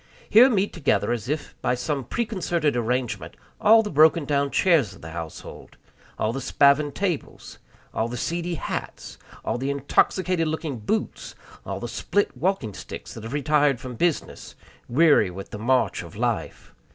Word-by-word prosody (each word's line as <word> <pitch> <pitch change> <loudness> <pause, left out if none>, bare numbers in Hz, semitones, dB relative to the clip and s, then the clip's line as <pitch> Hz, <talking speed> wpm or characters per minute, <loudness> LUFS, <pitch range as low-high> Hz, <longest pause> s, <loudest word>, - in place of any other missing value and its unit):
Here 245 +4 +7
meet 205 -4 0
together, 145 -7 +1
as 120 0 -3
if 150 +1 -3
by 125 - +1
some 140 +1 -3
preconcerted 175 - -1
arrangement, 115 -8 -2 0.2
all 225 +1 +6
the 210 - -5
broken 155 +1 +5
down 140 0 +1
chairs 140 - +2
of - - -17
the 80 - -8
household, 80 -1 -9 0.4
all 110 - 0
the 135 - -4
spavined 140 +2 +3
tables, 180 -7 -4 0.3
all 110 - 0
the 120 +1 -5
seedy 170 +6 -2
hats, - - -6 0.3
all - - -1
the 135 +2 -2
intoxicated 165 +5 +1
looking 155 -5 -3
boots, 215 - -3 0.3
all - - -4
the - - -5
split 205 -8 -1
walking 140 - -1
sticks - - -9
that 115 - -9
have 115 +3 -6
retired 145 -2 +2
from 125 -1 -7
business, 165 +6 -2 0.3
"weary 145 - +4
with 95 +2 -9
the 105 - -6
march 130 +4 +1
of - - -11
life." - - -3
140 Hz, 165 wpm, -24 LUFS, 120-170 Hz, 0.4 s, Here